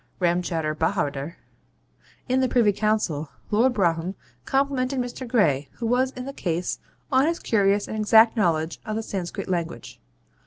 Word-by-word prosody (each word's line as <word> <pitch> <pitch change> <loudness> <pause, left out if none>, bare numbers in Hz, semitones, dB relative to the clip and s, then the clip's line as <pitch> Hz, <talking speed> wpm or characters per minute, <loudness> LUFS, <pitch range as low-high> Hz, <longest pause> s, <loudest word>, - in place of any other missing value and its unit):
Ramchowder 170 -3 0
Bahawder) 155 -2 -1 0.9
in 255 0 +2
the 260 -1 +2
Privy 230 -5 +3
Council, 200 -8 0 0.2
Lord 245 +4 +3
Brougham 175 -1 0 0.3
complimented 270 -1 0
Mr. 245 +1 -4
Gray, 150 - +2
who 235 - -6
was 250 +3 +2
in 250 0 -7
the 275 - -6
case, 175 -6 -2 0.3
on 265 +2 +4
his 335 +1 0
curious 200 -5 +1
and 220 - -4
exact 220 +2 +5
knowledge 165 -6 0
of 215 - -4
the 225 - -2
Sanscrit 195 0 -4
language. 170 -3 -4
205 Hz, 150 wpm, -24 LUFS, 170-245 Hz, 0.9 s, exact